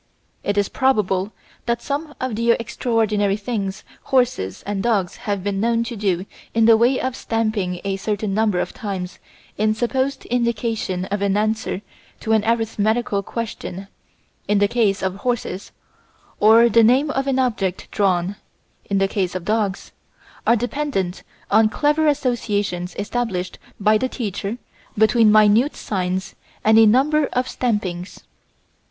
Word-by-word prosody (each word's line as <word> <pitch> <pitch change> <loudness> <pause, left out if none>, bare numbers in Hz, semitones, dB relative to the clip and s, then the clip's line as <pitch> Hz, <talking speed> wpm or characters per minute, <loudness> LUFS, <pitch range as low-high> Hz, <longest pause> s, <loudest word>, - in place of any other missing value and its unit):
It 205 0 -1
is 200 -1 +2
probable 210 -7 +1 0.4
that 235 0 +1
some 295 +1 -4
of 255 -4 -2
the 230 +2 0
extraordinary 215 -3 0
things 200 -3 -4 0.2
horses 230 - 0
and 200 -1 -2
dogs 205 -6 0
have 200 -2 -1
been 200 -1 -1
known 230 0 +2
to 235 0 -5
do 195 -3 -1 0.3
in 225 -1 +4
the 225 0 +7
way 240 +4 +3
of 260 -1 -2
stamping 215 -7 -1
a 195 -1 -2
certain 205 0 -2
number 210 -3 +1
of - - -3
times 195 -6 -5 0.4
in 215 0 +2
supposed 260 +4 -1
indication 230 -6 -1
of 205 0 -1
an 200 0 +1
answer 215 -2 -1 0.4
to 220 - -2
an 220 -1 +3
arithmetical 220 -2 0
question 200 -3 -6 0.6
(in 210 - +2
the 205 0 +4
case 205 -4 +1
of 190 0 -1
horses), 215 -4 -3 0.7
or 220 +2 +7
of 235 -3 +3
the 230 - +6
name 265 +6 +4
of 270 -1 -1
an 270 -1 +1
object 210 -8 -1
drawn 190 -1 +1 0.5
(in 200 - +1
the 195 0 +3
case 185 -2 -2
of 180 -2 -4
dogs), 210 -2 -1 0.6
are 235 - +6
dependent 240 -6 -2 0.3
on 215 +1 +5
clever 300 +6 +1
associations 210 -10 -1
established 205 -4 -3 0.2
by 215 +1 +3
the 260 - -1
teacher 210 -2 -4 0.4
between 220 0 +5
minute 215 +6 +4
signs 185 -2 -3 0.3
and 220 +1 +6
a 225 - +7
number 280 +6 +3
of 250 +1 0
stampings. 195 -9 -3
215 Hz, 150 wpm, -21 LUFS, 195-235 Hz, 0.7 s, the